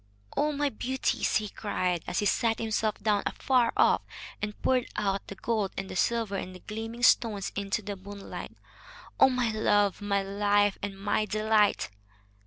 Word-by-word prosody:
"Oh, 300 +1 +2
my 290 0 0
beauties!" 260 +2 -1
he 215 - +1
cried, 180 -5 -2
as 180 - -2
he 205 - +1
sat 225 +2 +2
himself 220 -1 -1
down 210 -2 +2
afar 250 -3 +2
off - - +4 0.4
and 205 0 -4
poured 255 -2 +2
out 195 -2 -1
the 200 - -7
gold 210 -1 -1
and 195 0 -4
the - - -6
silver 225 +1 +1
and 185 -1 -6
the - - -10
gleaming 225 +2 -6
stones 210 -5 +3
into 200 +2 -2
the 205 0 -4
moonlight. 200 +1 -9 0.6
"Oh, - - +8
my 250 -3 0
love, 205 -2 +2
my 200 -1 0
life, 205 0 +2
and 195 -1 -5
my 205 +1 +1
delight! 215 - +2
210 Hz, 170 wpm, -28 LUFS, 200-225 Hz, 0.6 s, Oh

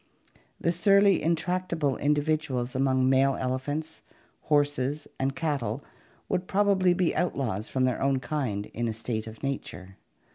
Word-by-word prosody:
The 170 - +1
surly, 200 +1 +4
intractable 170 -3 0
individuals 145 -4 0
among 130 -1 +2
male 135 +1 +4
elephants, 145 +5 -3 0.4
horses, 145 -1 0
and 135 0 0
cattle 135 -4 -2 0.4
would 180 +1 -1
probably 195 -3 +3
be 180 -1 +1
outlaws 120 - -1
from 130 - 0
their 130 -1 +1
own 135 -1 +2
kind 125 -7 -2
in 120 +1 -1
a 110 - -3
state 110 -1 -4
of 110 +3 -11
nature. 95 -8 -5
140 Hz, 135 wpm, -27 LUFS, 130-165 Hz, 0.4 s, surly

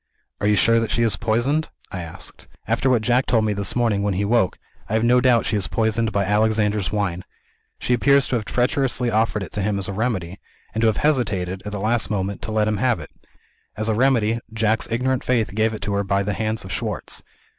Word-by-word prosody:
"Are 105 - 0
you 105 - +4
sure 115 +2 +4
that 115 - -2
she 115 - +1
is 110 -3 +3
poisoned?" 130 +8 0 0.2
I 90 - -4
asked. 80 -1 -9 0.2
"After 135 - +1
what 120 -4 +2
Jack 125 +3 +2
told 115 -3 +2
me 105 - +1
this 100 -1 -1
morning 115 -5 +1
when 100 -2 0
he 100 +2 0
woke, 110 -3 +2 0.3
I - - -3
have 110 +1 +2
no 125 +1 +4
doubt 125 -2 +3
she - - 0
is 100 - -1
poisoned 110 0 0
by 100 -1 0
'Alexander's 105 -1 +1
Wine.' 95 -4 -1 0.5
She 125 - -1
appears 140 +3 +4
to - - 0
have 110 -3 -2
treacherously 125 +1 0
offered 110 -1 +1
it 85 - -9
to 105 - -3
him 100 +1 0
as 100 - +1
a 100 - -4
remedy 100 -5 -2 0.3
and 110 - -1
to 115 - +4
have 110 - +1
hesitated, 100 -11 0
at - - -4
the 105 - -4
last 110 +2 0
moment, 100 -1 -2
to 110 - -5
let 110 -1 +1
him 110 -1 0
have 120 -2 +1
it. 75 - -10 0.7
As 110 +1 -1
a - - +2
remedy, 115 -2 +2
Jack's 110 -1 0
ignorant 125 +2 0
faith 115 -5 0
gave 110 +1 +1
it 110 - -6
to 100 - -2
her 100 0 +1
by 100 0 0
the 105 +1 -2
hands 110 0 -2
of 95 - -8
Schwartz. - - -3
110 Hz, 235 wpm, -22 LUFS, 100-120 Hz, 0.7 s, you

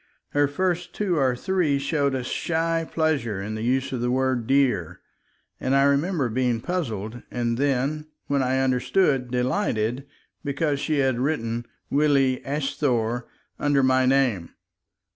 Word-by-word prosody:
Her 145 0 +2
first 175 +4 -2
two 190 -5 0
or 130 -2 +2
three 170 -1 +1
showed 140 -1 0
a 130 - -2
shy 165 +4 -1
pleasure 140 -11 0
in 105 +2 -4
the 110 - -4
use 130 +3 0
of 125 -3 -3
the 120 - 0
word 130 -2 0
"dear," 135 - +1 0.6
and 130 +1 0
I 140 - +5
remember 140 +1 +2
being 125 +1 +1
first 115 - -15
puzzled 120 - -3
and 120 -1 -1
then, 140 +3 0 0.2
when 140 -1 +1
I 130 +1 +1
understood, 130 +1 +1
delighted, 125 - -1 0.4
because 145 0 -1
she 150 +1 0
had 130 -3 +1
written 120 -4 -1 0.2
"Willie 140 -3 +3
asthore" 135 -5 -1 0.3
under 145 -2 +2
my 130 0 +3
name. 125 -10 +2
135 Hz, 145 wpm, -24 LUFS, 125-145 Hz, 0.6 s, I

